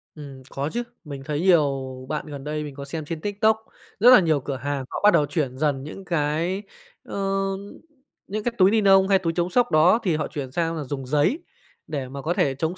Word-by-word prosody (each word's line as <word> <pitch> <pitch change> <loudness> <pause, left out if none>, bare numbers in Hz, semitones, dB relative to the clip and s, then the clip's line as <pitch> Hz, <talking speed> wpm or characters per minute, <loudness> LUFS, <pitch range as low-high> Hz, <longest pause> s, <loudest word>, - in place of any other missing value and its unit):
Ừm, 140 -3 -10
có 140 +2 -3
chứ. 240 0 -1 0.2
Mình 140 -3 -7
thấy 150 +1 -2
nhiều 150 -7 +3 0.3
bạn, 150 0 -3
gần 140 -2 -7
đây 150 0 -3
mình 145 -2 -8
có 140 -1 -7
xem 155 +1 -5
trên 160 0 -5
TikTok, 210 +2 +2 0.4
rất 240 +4 +7
là - - +9
nhiều 160 -5 +2
cửa 140 0 -4
hàng 140 0 -3
họ - - -4
bắt 210 - +7
đầu 145 - +4
chuyển 140 -4 -2
dần 140 -3 0
những 185 +6 -9
cái, 170 +5 -1 0.4
ơ, - - -7 1.1
những 210 +2 -4
cái 240 - 0
túi 190 +1 +5
ni 220 -1 +3
nông 195 -1 +5
hay 195 -1 +4
túi 165 -3 -1
chống 175 +1 0
sốc 245 +5 +2
đó, 165 +9 +5
thì 175 -5 +1
họ 150 - -2
chuyển 135 -3 -6
sang 165 +1 -1
là 150 - -3
dùng 135 -1 -5
giấy, 150 - +1 0.5
để 140 -4 -4
mà 140 +1 -7
có 165 +4 -1
thể 135 -5 +1
chống 160 +5 -2
155 Hz, 230 wpm, -24 LUFS, 140-185 Hz, 1.1 s, là